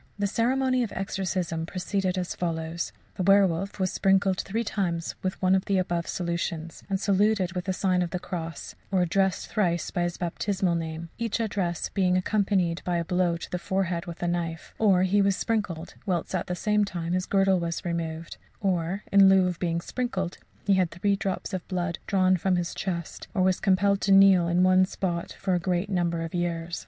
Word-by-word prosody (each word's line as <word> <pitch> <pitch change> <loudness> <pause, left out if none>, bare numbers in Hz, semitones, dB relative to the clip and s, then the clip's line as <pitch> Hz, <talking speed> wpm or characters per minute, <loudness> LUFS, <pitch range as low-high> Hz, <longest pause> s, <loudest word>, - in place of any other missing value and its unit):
The 205 - 0
ceremony 255 +4 +1
of 230 - -2
exorcism 185 -4 -2
proceeded 185 0 -2
as 180 -1 -2
follows: 165 -1 -3 0.3
The - - -2
werwolf 195 0 +3
was 185 -1 +1
sprinkled 195 -1 +2
three 225 +4 -2
times 175 -6 -2
with 185 0 -3
one 185 0 +4
of 190 0 +2
the 195 - +1
above 175 -2 -1
solutions, 170 -2 -3
and 195 -1 0
saluted 200 -2 +2
with 180 -1 -3
the 190 - 0
sign 185 -1 +1
of 175 - -1
the 180 - -2
cross, 165 -2 -6 0.2
or 185 -2 +3
addressed 190 +1 0
thrice 175 -6 0
by 175 - -1
his 175 0 -1
baptismal 185 +1 -1
name, 165 0 -4
each 230 -1 -1
address 195 -6 -1
being 185 -2 +2
accompanied 185 -3 +1
by 175 -1 0
a 170 - -1
blow 180 -1 +1
on 170 - -4
the 180 - -2
forehead 180 -2 -1
with 170 0 -7
a - - +1
knife; 170 -2 -3
or 195 -4 +4
he 200 +2 +3
was 195 -1 +3
sprinkled, 190 -8 -2
whilst 175 -2 -1
at 185 - -1
the 180 - -2
same 210 +3 +2
time 175 -4 -3
his 185 0 -1
girdle 195 -1 +3
was 170 +2 -3
removed; 165 -1 -4 0.2
or 185 0 -1
in 195 -1 +7
lieu 190 -1 +5
of 180 -2 -3
being 170 -1 0
sprinkled, 190 -6 -3 0.3
he 200 - +4
had 185 -3 +2
three 200 +4 0
drops 195 +1 -3
of 185 -2 -4
blood 175 -2 -2
drawn 185 -2 +3
from 185 +2 +1
his 175 -1 -2
chest, 170 -4 -4
or 185 - +3
was 185 -1 +2
compelled 200 0 +2
to 195 - +1
kneel 195 -3 +7
in 175 +1 +3
one 185 0 +5
spot 175 -2 -3
for 190 - -2
a 180 - +2
great 180 +3 -1
number 170 -2 0
of 165 - -6
years. 170 -1 -2
185 Hz, 200 wpm, -27 LUFS, 170-195 Hz, 0.3 s, in